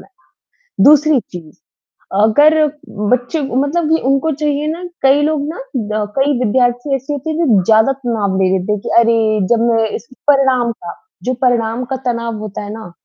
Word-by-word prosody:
लें। 370 -3 -23 0.6
दूसरी 300 -1 +5
चीज़, 165 -7 -12 0.7
अगर 290 +9 +5 0.6
बच्चों 250 +6 0 0.2
मतलब 305 +3 -1
ये 320 - +4
उनको 275 +4 +1
चाहिए 295 0 0
ना, 345 +2 -7 0.2
कई 275 +2 +4
लोग 295 -1 0
ना 325 - -6 0.2
ब 215 -3 -3
अ, - - -1
कई 275 -1 +1
विद्यार्थी 245 +4 +1
ऐसे 270 +2 -6
होते 290 +2 -4
हैं, 310 - -3
जो 210 -8 +3
ज़्यादा 220 +6 +4
तनाव 230 -7 -2
ले 185 - +3
लेते 190 +3 -2
हैं 210 - -2
कि - - -7
अरे, 230 0 +4 0.4
जब 230 - 0
मैं 225 -1 +1
इस 230 - -11 0.2
परिणाम 265 -4 +2
का, 175 -6 -9 0.3
जो 255 - -1
परिणाम 240 -1 +1
का - - 0
तनाव 235 -2 -2
होता 210 -2 -6
है 205 - -7
ना, 220 -4 -9
250 Hz, 185 wpm, -16 LUFS, 220-290 Hz, 0.7 s, दूसरी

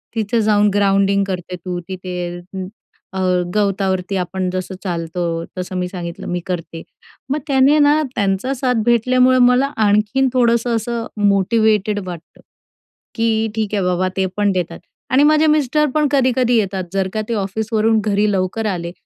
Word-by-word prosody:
तिथं 225 +1 0
जाऊन 210 -1 +3
ग्राउंडिंग 200 0 +2
करते 180 -1 -4
तू 180 0 -5
तिथे." 185 -1 -6 0.2
हं. 185 +1 -7 0.5
अ, 190 - -3 0.4
गवतावरती 195 -2 0
आपण 185 +1 -2
जसं 185 +1 -4
चालतो 170 -2 -3 0.3
तसं. 185 0 -5
मी 180 0 -1
सांगितलं, 175 -2 -7
मी 175 - -2
करते. 165 -3 -5 0.5
मग 290 +3 0
त्याने 275 +1 +4
ना, 295 +1 +4
त्यांचा 200 +5 0
साथ 255 -1 0
भेटल्यामुळं 255 +2 +3
मला 255 +3 +2
आणखीन 210 +6 +2
थोडंसं 235 -1 +2
असं 230 +1 -3 0.2
मोटिव्हेटेड 210 +1 +2
वाटतं, 175 -2 -10 0.7
की 225 -1 +1
ठीक 215 -2 -2
आहे 200 - 0
बाबा, 180 0 +1
ते 190 - +2
पण 205 -1 +2
देतात. 175 -3 -3 0.3
आणि 265 +2 +4
माझे 305 +1 +4
मिस्टर 300 -1 +2
पण 300 -1 +3
कधी-कधी 255 -3 +2
येतात, 195 -3 -1
जर 195 -1 0
का 215 - -1
ते - - 0
ऑफिसवरून 220 +2 0
घरी 210 0 +2
लवकर 190 +3 -1
आले, 170 -1 -5
205 Hz, 155 wpm, -18 LUFS, 185-240 Hz, 0.7 s, त्याने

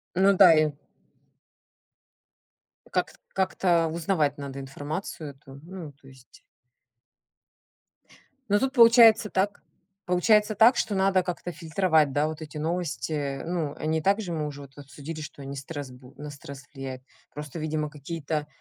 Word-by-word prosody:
Ну 195 +2 +5
да, 185 -3 +8
и 155 -1 +2 2.2
Как - - -1
т - - -23
как-то 180 -3 +1
узнавать 160 -3 0
надо 140 -1 -7
информацию 145 +4 -6
эту, 135 -1 -15
ну, 175 -3 -8
то 135 0 -21
есть. 130 -1 -18 2.1
Ну 205 - +4
тут 265 +3 -1
получается 230 -3 +7
так 200 +2 -1 0.4
получается 210 +4 +3
так, 230 +5 +6
что 205 - 0
надо 190 -1 +3
как-то 180 0 -5
фильтровать, 160 -3 +1
да, 145 +2 +2
вот 155 0 -7
эти 155 -1 -8
новости, 165 0 -3
э. 140 -2 -3
Ну, 165 -4 -3
они 160 +1 -1
и - - -6
так 200 +6 +2
же, 185 -5 -5
мы 155 -2 -2
уже 145 -1 -8
обсудили, 145 +3 -8
что 150 -1 -9
они 140 0 -7
стресс 140 -1 -7
бу 125 +1 -15
на 150 0 -7
стресс 140 -1 -10
влияют. 130 -2 -7 0.3
Просто, 150 +2 -7
видимо, 155 -1 -2
какие-то, 150 0 -4
155 Hz, 150 wpm, -26 LUFS, 145-185 Hz, 2.2 s, да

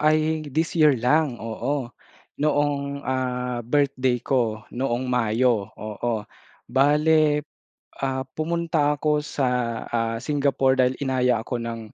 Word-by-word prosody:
ay 155 0 +2
this 160 +4 -1
year 150 -3 +6
lang. 135 +2 +2
Oo, 120 +3 -3 0.5
noong, 145 -1 0
ah, 125 -1 -2
birthday 130 -1 +1
ko, 115 -5 0
noong 125 0 -1
Mayo. 115 -2 +2
Oo, 110 0 -3 0.4
bale, 150 +3 +3 0.5
ah, 135 -1 -1
pumunta 160 -2 +1
ako 150 +1 +1
sa, 135 -3 -1 0.4
ah, 115 -1 0
Singapore 140 -2 +2
dahil 130 0 +3
inaya 125 -4 +1
ako 125 - -3
ng, 115 0 -4
130 Hz, 115 wpm, -24 LUFS, 120-150 Hz, 0.5 s, year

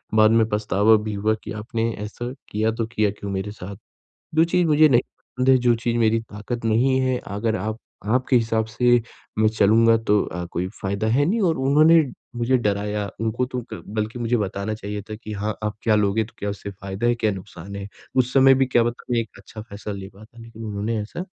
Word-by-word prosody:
बाद 110 0 +6
में 115 -1 +4
पछतावा 105 +1 +3
भी 105 - -3
हुआ 105 +2 +1
कि - - -7
आपने 115 +1 -1 0.2
ऐसा 120 +3 -6 0.2
किया, 110 +1 +1
तो 115 0 -2
किया 110 -3 +1
क्यों 100 -1 -5
मेरे 95 +2 -3
साथ? 100 -1 -8 0.6
जो 160 - +6
चीज़ 175 0 +2
मुझे 155 0 +6
नहीं 120 -3 +5
पसंद 125 +1 -4
है, 130 - +7
जो 120 -1 +3
चीज़ 120 +1 -1
मेरी 115 -1 +3
ताकत 115 +2 -6
नहीं 125 +4 +3
है, 130 -1 +1
अगर 110 +2 -1
आप 110 +4 -3 0.3
आपके 125 +4 +2
हिसाब 115 -2 +2
से 120 +2 +3 0.4
मैं 110 - +5
चलूँगा 110 +2 +4
तो 105 -2 +2
अ, 90 0 -5
कोई 90 +2 -2
फायदा 100 +3 -1
है 130 +6 +3
नहीं 215 +8 +1
और 160 - 0
उन्होंने 155 +5 +5 0.4
मुझे 125 +2 +2
डराया। 105 -2 -1
उनको 115 +3 0
तो 125 -1 -4
क 85 - -7
बल्कि 110 +3 -3
मुझे 120 +1 +1
बताना 100 +1 -2
चाहिए 105 -1 -5
था 110 - -4
कि 110 - -6
हाँ 105 +1 -3
आप 105 0 -2
क्या 110 -2 +3
लोगे? 105 +1 +2
तो 120 - -17
क्या 100 - -2
उससे 100 0 -6
फायदा 100 +3 -4
है? 120 - +3
क्या 110 -2 0
नुकसान 95 0 -9
है? 100 0 -6 0.3
उस 125 -1 +2
समय 135 0 +7
भी 135 - +3
क्या 120 -2 +3
पता 120 +1 -3
मैं 120 - +3
एक 115 -2 -3
अच्छा 105 +2 -10
फैसला 105 -1 -7
ले 95 -1 -7
पाता, 110 +3 -16
लेकिन 115 -1 -10
उन्होंने 105 +2 -2
ऐसा 140 - -6
110 Hz, 220 wpm, -23 LUFS, 105-120 Hz, 0.6 s, है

